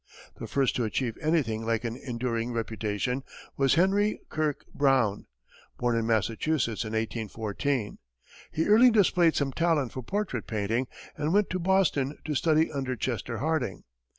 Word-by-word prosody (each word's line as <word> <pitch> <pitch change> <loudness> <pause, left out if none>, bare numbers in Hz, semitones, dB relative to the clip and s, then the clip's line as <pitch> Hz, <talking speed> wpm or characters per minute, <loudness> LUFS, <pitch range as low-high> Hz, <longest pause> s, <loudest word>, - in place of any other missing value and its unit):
The - - -5
first 135 -2 +1
to 125 - +1
achieve 115 +1 -1
anything 140 -9 +1
like 115 0 0
an 115 -1 -3
enduring 120 -2 -3
reputation 115 +2 -2 0.3
was 135 -1 +3
Henry 200 +4 +2
Kirke 155 -2 -2
Brown, 130 -8 +2 0.5
born 120 -1 +1
in 115 -1 0
Massachusetts 115 +3 0
in 110 0 -6
1814. 110 +2 -2 0.5
He 160 - 0
early 225 +4 +7
displayed 180 -6 +4
some 140 -2 0
talent 160 -6 +1
for 130 - -5
portrait 180 - -3
painting, 110 +4 -1 0.3
and 150 +2 -1
went 210 -1 +3
to 185 - -1
Boston 170 -7 +1
to 155 - -1
study 155 +2 +2
under 130 -2 -2
Chester 120 0 -3
Harding. 155 - -1
130 Hz, 150 wpm, -28 LUFS, 115-160 Hz, 0.5 s, early